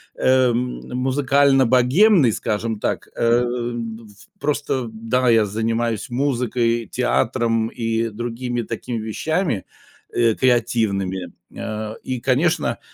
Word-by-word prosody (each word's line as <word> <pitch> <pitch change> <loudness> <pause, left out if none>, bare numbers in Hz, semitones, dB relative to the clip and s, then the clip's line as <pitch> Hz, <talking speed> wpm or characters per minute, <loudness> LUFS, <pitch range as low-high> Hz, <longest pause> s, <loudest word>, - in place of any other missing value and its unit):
эм, 125 -1 +2
музыкально-богемной, 135 - +4
скажем 110 0 -2
так, - - -2
эм, 120 -1 -1
в 105 -1 -20
просто, 135 -4 -1
да, 115 +3 0
я 115 -2 +5
занимаюсь 115 +3 -2
музыкой, 120 -3 0
театром 115 -2 +1
и 115 0 -1
другими 120 +2 -4
такими 115 +2 -5
вещами, 115 - -1 0.5
э, 115 -2 +2
креативными, 110 -7 0 0.3
а, 110 0 -4
и, 130 -2 -3
конечно, 135 +7 +1
120 Hz, 95 wpm, -21 LUFS, 115-130 Hz, 0.5 s, я